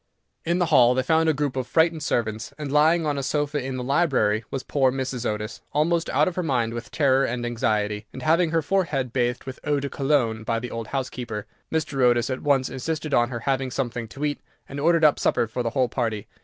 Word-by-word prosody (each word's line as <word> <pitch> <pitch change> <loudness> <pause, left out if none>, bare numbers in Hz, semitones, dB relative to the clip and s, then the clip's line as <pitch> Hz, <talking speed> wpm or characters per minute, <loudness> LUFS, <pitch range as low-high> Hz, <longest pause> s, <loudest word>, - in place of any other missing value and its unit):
In 170 +1 +1
the 180 - +2
hall 125 -5 +5
they 130 - +1
found 160 +2 +3
a - - +6
group 145 -2 -2
of 130 -2 -2
frightened 160 0 +2
servants, 110 -5 -2
and 150 -3 -5
lying 160 +3 +4
on 145 -2 0
a - - -1
sofa 145 +1 -1
in 130 0 -4
the 125 - -3
library 125 -7 +2
was 135 - -4
poor 135 -3 +2
Mrs. 130 -2 -3
Otis, 105 +1 -5
almost 165 +3 +1
out 145 +3 +3
of 185 - -1
her 180 - 0
mind 125 -8 0
with 120 0 -6
terror 135 -3 +3
and 120 -1 -2
anxiety, 105 -3 -1
and 130 - -8
having 165 +3 +3
her 165 0 +1
forehead 145 -8 0
bathed 125 -1 0
with 130 -1 -8
eau 150 -2 +1
de 140 0 -4
cologne 135 -7 +1
by 115 +1 -1
the 120 +1 -5
old 115 -1 -5
housekeeper. 120 -5 -4 0.3
Mr. 155 -4 -1
Otis 120 0 +3
at 130 - -3
once 135 -3 +2
insisted 155 +2 -4
on 120 -2 +3
her 120 -2 -5
having 135 +1 0
something 120 -2 -3
to 140 +7 -5
eat, 145 -1 -2 0.3
and 140 - -6
ordered 165 +1 +4
up 150 - +4
supper - - +2
for 115 +3 -4
the 120 - -1
whole 130 +1 +1
party. 115 -4 -2
130 Hz, 230 wpm, -24 LUFS, 120-150 Hz, 0.3 s, a